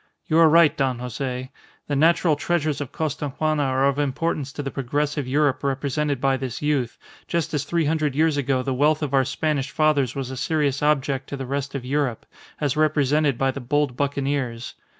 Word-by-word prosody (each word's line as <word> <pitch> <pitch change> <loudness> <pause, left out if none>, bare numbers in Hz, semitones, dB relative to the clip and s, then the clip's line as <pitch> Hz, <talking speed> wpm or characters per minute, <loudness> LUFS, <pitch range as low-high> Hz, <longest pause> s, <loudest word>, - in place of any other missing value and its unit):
You 160 +1 +2
are 165 -1 +7
right, 165 -1 +5
Don 130 -3 0
Jose. 125 +1 -4 0.3
The 145 - -2
natural 165 +2 +3
treasures 155 -2 -1
of 140 - -5
Costaguana 155 0 -1
are 135 -1 +1
of 140 +1 0
importance 145 0 -1
to 145 - -5
the 135 - -4
progressive 145 +1 -2
Europe 145 0 +1
represented 140 +1 -1
by 135 0 +2
this 130 -2 -5
youth, 145 -6 -1 0.3
just 170 -2 -1
as 145 -2 -1
three 170 +1 0
hundred 150 -2 0
years 160 0 +3
ago 135 -2 0
the 135 - -1
wealth 150 +4 +2
of 140 -2 -3
our 135 -1 +4
Spanish 145 -2 -1
fathers 145 -3 +1
was 135 -2 -4
a 130 - -6
serious 145 -1 0
object 140 -2 0
to 140 - -4
the 135 - -5
rest 140 +1 -3
of 130 -3 -4
Europe 135 -3 -1 0.3
as 145 -3 0
represented 150 -2 +2
by 135 0 +1
the 140 - -7
bold 145 +1 0
buccaneers. 140 -3 -2
140 Hz, 190 wpm, -23 LUFS, 135-150 Hz, 0.3 s, are